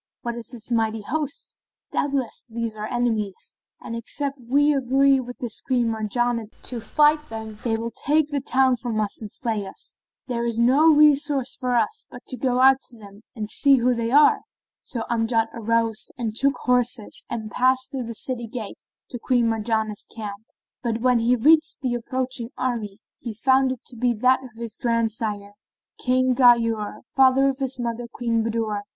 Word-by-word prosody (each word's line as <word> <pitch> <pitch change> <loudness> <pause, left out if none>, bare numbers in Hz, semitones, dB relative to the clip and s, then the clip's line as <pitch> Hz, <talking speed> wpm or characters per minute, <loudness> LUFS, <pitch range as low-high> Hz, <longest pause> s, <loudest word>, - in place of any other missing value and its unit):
What 235 - -2
is 235 -1 -8
this 240 -1 -9
mighty 225 -2 0
host? 295 +4 -4 0.4
Doubtless, 275 -4 -2
these 230 -1 -4
are 215 0 -5
enemies, 220 -5 -2 0.3
and 230 - -7
except 275 +4 -3
we 285 +5 +3
agree 270 0 +3
with 245 -1 -7
this 235 -3 -3
Queen 245 -3 +1
Marjanah 230 +1 -1 0.2
to 240 -2 -3
fight 300 +6 +2
them, 220 -1 -7
they 225 -2 0
will 230 +1 -4
take 300 +5 +1
the 285 - 0
town 260 -1 +2
from 235 -2 -3
us 210 0 -2
and 215 - -6
slay 225 -5 -2
us. - - -9 0.3
There 235 -2 -2
is 230 -1 -2
no 275 +7 +5
resource 290 -3 +3
for 250 -1 -1
us 225 -3 0
but 245 - -12
to - - -3
go 250 0 0
out 265 0 +6
to 240 - -15
them 205 -1 -14
and 215 -2 -4
see 280 -1 +5
who 250 0 +2
they 230 -1 -2
are." 290 +4 +5 0.4
So 235 -3 -4
Amjad 225 -1 +1
arose 230 -1 0
and 225 -3 -3
took 275 +4 +3
horse 250 0 +3 0.3
and 220 -2 -5
passed 260 +1 +2
through 260 -4 -4
the 230 - -6
city 245 -2 -3
gate 225 -3 -7 0.3
to 245 - -5
Queen 245 -1 +2
Marjanah's 220 -1 -2
camp; 210 -1 -8 0.4
but 230 -2 -2
when 250 -1 +3
he 235 +2 +3
reached 310 +6 +4
the 250 -2 0
approaching 250 0 -2
army 225 -6 -2 0.2
he 230 -3 -6
found 265 +3 +3
it 255 - -7
to 245 - -5
be 240 +1 +1
that 255 +4 +3
of 260 - -9
his 230 -2 -7
grand 230 -2 +1
sire, 205 -2 -4 0.5
King 255 0 +2
Ghayur, 230 -4 +3
father 270 +1 +4
of 270 0 -4
his 265 -1 -2
mother 235 -1 -3
Queen 230 -2 -1
Budur. 220 -2 -2
240 Hz, 180 wpm, -23 LUFS, 225-260 Hz, 0.5 s, out